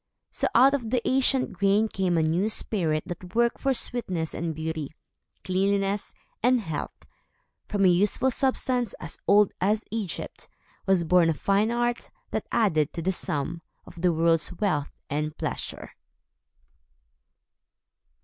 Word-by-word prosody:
So, - - 0
out 265 +4 +7
of 245 -6 -1
the 245 -1 0
ancient 265 0 +2
grain 200 +3 +2
came 185 -4 0
a 160 - +3
new 170 +7 +1
spirit 165 -8 -1
that 180 +1 -8
worked 235 0 +2
for 270 - +1
sweetness 185 -10 -1
and 165 -1 -3
beauty, 160 -1 -4 0.5
cleanliness, 195 +2 0 0.3
and 250 +1 +4
health. 160 -9 -6 0.6
From 200 -2 +1
a - - +7
useful 205 +8 +2
substance, 255 -3 0
as 165 - -8
old 205 0 +5
as 210 +3 +1
Egypt, 215 -5 -5 0.4
was 190 -3 +3
born 175 0 +4
a 160 - +1
fine 200 +6 +2
art, 240 0 -1 0.2
that - - -3
added 160 -9 +2
to 170 - -4
the 190 - +2
sum 165 -1 -3 0.2
of 170 - -12
the 180 -1 +4
world's 165 0 +2
wealth 170 -7 -1 0.2
and 150 +1 -3
pleasure. - - -5
190 Hz, 140 wpm, -26 LUFS, 165-225 Hz, 0.6 s, out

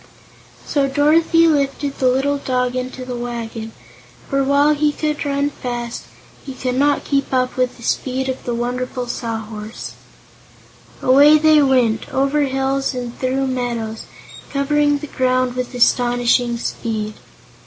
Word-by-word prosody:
So 280 -2 +1
Dorothy 320 +4 +4
lifted 280 -2 0
the 260 - +3
little 275 +3 +1
dog 250 -2 -1
into 255 0 -4
the 250 -1 -5
wagon, 230 -2 -5 0.6
for, 275 -1 +1
while 285 +2 +3
he 300 0 +1
could 300 0 -2
run 285 0 0
fast, 240 -3 -5 0.4
he 270 - -8
could 255 -1 -2
not 285 +3 +2
keep 275 -1 -1
up 255 -1 0
with 255 -1 -1
the 235 - -13
speed 260 +2 -1
of 260 -1 -4
the 240 - -2
wonderful 250 +1 -3
Sawhorse. 225 -2 -6 1.1
Away 285 +4 +7
they 310 0 +5
went, 250 -5 +2
over 275 +2 +1
hills 270 0 -1
and 245 -1 -5
through 265 +1 0
meadows, 240 -4 -3 0.4
covering 290 +1 +1
the 295 - -7
ground 255 -2 0
with 250 0 -4
astonishing 245 0 +2
speed. 220 -2 -3
255 Hz, 140 wpm, -19 LUFS, 245-280 Hz, 1.1 s, Away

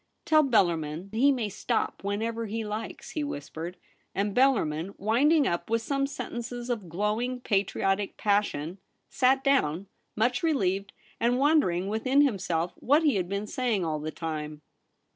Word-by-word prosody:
' - - -49
Tell 310 -1 +5
Bellarmin 175 - +1
he 265 +6 +4
may 245 -5 -1
stop 200 - -2
whenever 225 +3 -2
he 220 +1 -3
likes,' 210 +2 -6
he 305 - -2
whispered; 165 - -6 0.4
and 200 +1 0
Bellarmin, 200 - +2
winding 275 - +3
up 170 -3 -1
with 230 0 +1
some 275 +2 0
sen 280 - -6
tences 240 +1 -4
of 210 -7 -4
glowing 215 +8 -1
patriotic 195 -2 0
passion, 200 -5 0 0.3
sat 265 0 +3
down, 200 - +2 0.3
much 245 +3 +1
relieved, 200 - 0 0.3
and 240 +2 +2
wondering 270 - +3
within 255 +7 +2
himself 175 - 0
what 290 +5 +3
he 295 -3 +4
had 180 -2 -2
been 200 +1 -2
saying 230 -6 -1
all 155 -2 -1
the 155 +1 -4
time. 155 -2 -5
210 Hz, 155 wpm, -28 LUFS, 180-255 Hz, 0.4 s, Tell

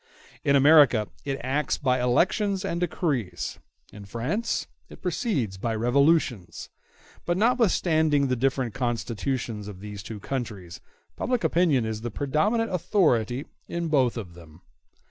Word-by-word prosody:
In 140 - +3
America, 140 -6 +6 0.2
it 135 -1 -2
acts 135 +2 0
by 130 -3 +1
elections 190 - +1
and 170 -3 -2
decrees; 155 - -2 0.3
in 100 -1 -10
France 125 - -2 0.2
it - - -13
proceeds 125 - -2
by 115 +2 -1
revolutions; 120 - +1 0.5
but 175 0 0
notwithstanding 170 - +2
the 130 - +1
different 130 -1 0
constitutions 120 -3 -3
of 100 -3 -9
these 105 0 -7
two 105 +1 -8
countries, 100 -7 -5 0.3
public 250 -1 -1
opinion 160 -9 +2
is 110 -1 -4
the 120 - -3
predominant 200 - 0
authority 150 - +1 0.2
in 170 -1 -3
both 130 -6 +2
of 95 -7 -7
them. 85 0 -15
130 Hz, 130 wpm, -26 LUFS, 110-165 Hz, 0.5 s, America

